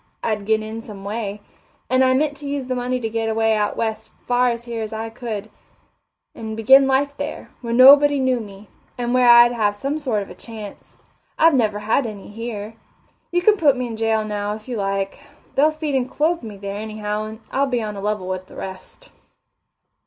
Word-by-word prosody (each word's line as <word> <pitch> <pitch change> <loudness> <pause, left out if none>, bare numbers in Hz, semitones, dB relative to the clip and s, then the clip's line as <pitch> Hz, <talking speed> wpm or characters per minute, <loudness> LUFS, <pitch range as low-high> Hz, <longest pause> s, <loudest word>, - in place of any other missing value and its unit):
I'd 210 -3 -2
get 220 0 +2
in 220 +1 -6
some 205 -3 -10
way 205 0 -4 0.5
and 255 +1 +3
I 260 0 +4
meant 295 +1 +1
to 285 0 -8
use 280 -2 -3
the 255 - -2
money 250 0 -1
to 225 - -2
get 225 0 -2
away 225 0 +2
out 210 -1 -1
west 220 -1 -3
as - - -35
far 245 -1 +2
from 235 0 -11
here 230 -1 -3
as 220 0 -5
I 225 +1 -4
could, 220 -3 -6 0.8
and 220 -1 -6
begin 265 +5 +6
life 280 +1 +1
there, 285 +2 -6
where 235 -2 -4
nobody 280 +3 +7
knew 260 -2 +1
me, 200 -1 -10 0.3
and 245 0 -2
where 250 -1 +5
I'd 240 0 +8
have 210 -4 0
some 275 +8 -3
sort 235 -9 -1
of 195 - -12
a - - -7
chance. 215 +1 -10 0.4
I've 325 0 +5
never 220 -6 +2
had 225 +4 +1
any 205 -3 -9
here. 220 -1 -6 0.6
You 350 0 +1
can 425 +2 +5
put 285 -7 +4
me 250 - -2
in 230 -2 -5
jail 220 -1 0
now, 205 0 -3
if 215 +2 -13
you 250 - -4
like 195 -1 -2 0.3
they'll 295 +3 +4
feed 310 -2 -4
and 260 -1 0
clothe 325 +5 0
me 215 -4 -8
there, 200 0 -5
anyhow, 215 0 -4
and 220 0 -8
I'll 280 +1 +1
be 245 -3 -1
on 210 -1 -4
a 200 - -6
level 205 -2 -2
with 185 0 -4
the - - -15
rest." 190 - -9
225 Hz, 215 wpm, -21 LUFS, 210-260 Hz, 0.8 s, I'd